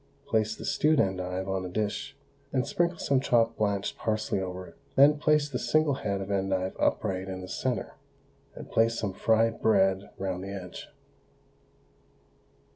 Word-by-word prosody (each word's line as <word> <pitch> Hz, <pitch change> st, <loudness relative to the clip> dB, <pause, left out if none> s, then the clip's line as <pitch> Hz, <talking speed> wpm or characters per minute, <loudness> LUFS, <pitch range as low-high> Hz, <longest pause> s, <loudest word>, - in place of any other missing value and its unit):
Place 110 Hz, 0 st, +1 dB
the -, -, -8 dB
stewed 155 Hz, 0 st, +2 dB
endive 95 Hz, 0 st, -1 dB
on 95 Hz, -1 st, -1 dB
a 90 Hz, -, -5 dB
dish, 105 Hz, +2 st, -3 dB, 0.3 s
and 130 Hz, -2 st, +1 dB
sprinkle 170 Hz, 0 st, 0 dB
some 140 Hz, -4 st, +2 dB
chopped 115 Hz, -3 st, +2 dB
blanched 100 Hz, -2 st, -1 dB
parsley 110 Hz, -2 st, -1 dB
over 90 Hz, 0 st, -5 dB
it, -, -, -15 dB, 0.2 s
then 145 Hz, +2 st, +6 dB
place 150 Hz, -1 st, +3 dB
the 130 Hz, -4 st, -3 dB
single 155 Hz, -2 st, +2 dB
head 100 Hz, -7 st, -2 dB
of 95 Hz, +1 st, -5 dB
endive 95 Hz, -1 st, 0 dB
upright 95 Hz, 0 st, 0 dB
in 95 Hz, -1 st, -5 dB
the 90 Hz, -, -7 dB
centre, -, -, -2 dB, 0.6 s
and -, -, -10 dB
place 115 Hz, 0 st, +3 dB
some 105 Hz, -4 st, -2 dB
fried 115 Hz, +3 st, +2 dB
bread 95 Hz, -2 st, +3 dB
round 95 Hz, -1 st, -3 dB
the 95 Hz, -, -6 dB
edge. 95 Hz, -3 st, -7 dB
100 Hz, 160 wpm, -28 LUFS, 95-115 Hz, 0.6 s, then